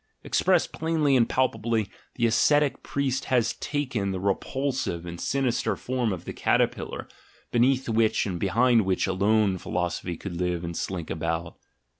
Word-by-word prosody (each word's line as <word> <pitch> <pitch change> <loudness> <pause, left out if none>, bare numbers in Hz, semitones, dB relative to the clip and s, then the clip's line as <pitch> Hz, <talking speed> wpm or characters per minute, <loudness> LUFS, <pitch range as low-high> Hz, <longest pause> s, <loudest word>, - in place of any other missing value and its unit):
Expressed 185 -3 +2
plainly 155 -3 +1
and 120 -3 +3
palpably, 115 -4 0 0.3
the 120 - +1
ascetic 145 +5 +3
priest 135 -2 -1
has 115 -3 +2
taken 130 -9 -2
the 95 -1 -2
repulsive 110 -1 -2
and 85 0 -7
sinister 130 -3 0
form 125 -3 -1
of 90 -3 -5
the - - -5
caterpillar, - - 0 0.4
beneath 130 +2 +2
which 110 -1 +2
and 90 -4 -3
behind 115 +5 +3
which 95 -1 +1
alone 100 0 +2
philosophy 90 -1 -3
could 95 -3 -6
live 90 -1 -1
and 85 0 -4
slink 90 -3 -4
about. 80 +1 -3
110 Hz, 145 wpm, -26 LUFS, 90-130 Hz, 0.4 s, and